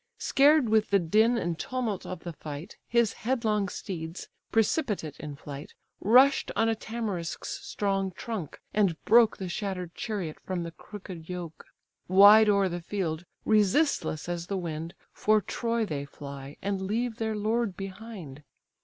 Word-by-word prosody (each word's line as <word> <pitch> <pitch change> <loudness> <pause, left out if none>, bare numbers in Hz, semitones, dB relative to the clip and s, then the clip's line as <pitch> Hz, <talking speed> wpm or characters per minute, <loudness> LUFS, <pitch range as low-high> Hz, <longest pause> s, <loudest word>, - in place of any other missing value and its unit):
Scared 285 -1 +4
with 215 -1 +3
the 200 - +5
din 215 +7 +3
and 170 -6 -2
tumult 245 -7 -3
of 185 -2 -6
the 170 - -6
fight, 150 +1 -8
His 235 -2 +2
headlong 220 -5 +1
steeds, 170 -3 -6 0.2
precipitate 215 - 0
in 150 -2 -6
flight, 140 0 -9 0.2
Rush'd 255 +7 +5
on 225 - +3
a 225 - +3
tamarisk's 220 -6 -4
strong 195 -1 -1
trunk, 190 - -6
and 195 -7 +2
broke 230 -1 +6
The 190 - -4
shatter'd 180 -1 -4
chariot 195 -9 -4
from 185 -2 -3
the 170 - -6
crooked 185 -3 -10
yoke; 175 -3 -6 0.4
Wide 205 +3 +8
o'er 200 -1 +4
the 175 -1 -4
field, 170 -2 -3 0.2
resistless 210 - +2
as 175 -1 -3
the 195 - -2
wind, 165 -1 -5 0.2
For 215 0 +3
Troy 230 +2 -1
they 145 -7 -4
fly, 140 0 -9
and 195 -1 -1
leave 225 +4 -1
their 220 -1 -1
lord 215 -1 0
behind. 195 -7 -8
195 Hz, 150 wpm, -28 LUFS, 170-220 Hz, 0.4 s, Wide